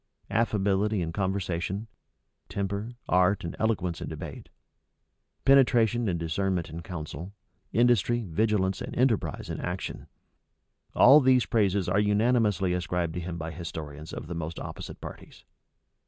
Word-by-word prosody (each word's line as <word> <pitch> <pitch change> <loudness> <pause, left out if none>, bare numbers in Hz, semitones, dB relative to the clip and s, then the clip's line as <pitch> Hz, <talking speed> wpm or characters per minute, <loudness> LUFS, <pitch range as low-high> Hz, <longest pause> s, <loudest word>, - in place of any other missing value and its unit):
Affability 105 -1 +1
in 80 0 -4
conversation; 95 0 -2 0.6
temper, 100 +4 -3
art, 90 +2 +3
and 85 - -5
eloquence 95 -7 0
in - - -4
debate; - - -8 1.0
penetration 120 -4 +4
and 85 -2 -1
discernment 85 0 -1
in 85 +2 -6
counsel; 85 +2 -7 0.4
industry, 120 -1 +3
vigilance, 95 +1 +1
and - - -5
enterprise 120 -4 +1
in - - -4
action; 90 0 -4 0.9
all 135 +5 +8
these 130 -3 +4
praises 100 -4 +1
are 95 +3 +2
unanimously 105 -3 +2
ascribed 90 -1 -1
to 90 - -3
him 85 0 -5
by 80 0 -5
historians 80 -2 -7
of - - -6
the 85 - -6
most 85 0 -5
opposite - - -7
parties. - - -10
95 Hz, 130 wpm, -28 LUFS, 85-110 Hz, 1.0 s, all